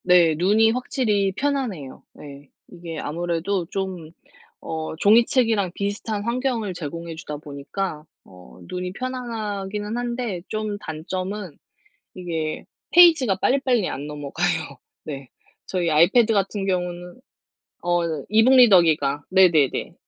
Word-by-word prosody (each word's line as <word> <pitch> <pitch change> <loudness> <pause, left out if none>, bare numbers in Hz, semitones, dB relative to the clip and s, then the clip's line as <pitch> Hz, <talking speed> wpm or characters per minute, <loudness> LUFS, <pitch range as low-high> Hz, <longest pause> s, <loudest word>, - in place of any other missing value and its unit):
네 175 -3 +5
눈이 210 +7 +3
확실히 225 -5 0
편안해요. 245 - -3
네. 140 -1 -12 0.2
이게 170 -2 -8
아무래도 170 +4 -2
좀 185 -4 -5 0.5
어 160 0 -4
종이책이랑 225 -1 +3
비슷한 205 +1 -3
환경을 235 -4 -2
제공해 165 +1 -6
주다 150 -2 -7
보니까 150 +3 -5 0.2
어 90 -10 -16
눈이 180 0 -5
편안하기는 215 -4 -4
한데 240 -7 -3
좀 215 -1 -3
단점은 185 +1 -5 0.6
이게 165 -4 -4 0.2
페이지가 320 - +6
빨리빨리 250 -2 +1
안 140 +2 -5
넘어가요. 150 +1 -3 0.3
네. 135 -4 -7 0.3
저희 175 -3 -1
아이패드 200 +9 +4
같은 195 0 -1
경우는 180 0 -3 0.6
어 175 0 +1 0.3
e-book 225 +5 +5
리더기가 160 - +5
네네네. 175 -7 +3
185 Hz, 275 characters per minute, -23 LUFS, 160-220 Hz, 0.6 s, 페이지가